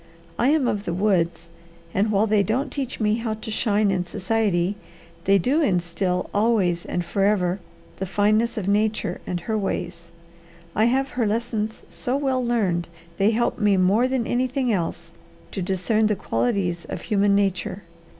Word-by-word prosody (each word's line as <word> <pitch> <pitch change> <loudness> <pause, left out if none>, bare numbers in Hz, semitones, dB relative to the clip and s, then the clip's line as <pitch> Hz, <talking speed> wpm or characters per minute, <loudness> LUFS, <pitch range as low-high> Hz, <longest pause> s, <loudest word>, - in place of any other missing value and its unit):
I 240 - +3
am 290 -3 +3
of 205 -2 -1
the 170 - -2
woods, 170 -4 0 0.4
and 210 +3 +1
while 205 +1 +3
they 215 -1 +3
don't 245 +9 -1
teach 270 -3 -4
me 215 0 +2
how 225 -2 -2
to 220 0 -7
shine 210 -2 +2
in 185 -2 0
society, 190 0 0 0.5
they 195 +1 +5
do 265 - +2
instil 180 - 0
always 205 -5 +2
and 175 - -2
forever 195 0 +1 0.4
the 190 - -3
fineness 215 +5 +2
of 200 -3 -2
nature 215 +2 0
and 175 -1 -2
her 220 +5 -2
ways. 175 -4 -3 0.7
I 215 - +4
have 265 +3 +1
her 235 -3 0
lessons 220 0 -2
so 250 +2 -2
well 265 -3 0
learned 195 -8 0 0.3
they 200 +2 +4
help 235 +2 0
me 205 -2 +3
more 200 +7 +3
than 260 -3 -1
anything 255 0 0
else 170 -2 -3 0.4
to 195 - -3
discern 195 +4 +1
the 210 - +1
qualities 190 -5 -1
of 185 - -6
human 200 -2 +2
nature. 200 0 -1
205 Hz, 165 wpm, -23 LUFS, 185-230 Hz, 0.7 s, they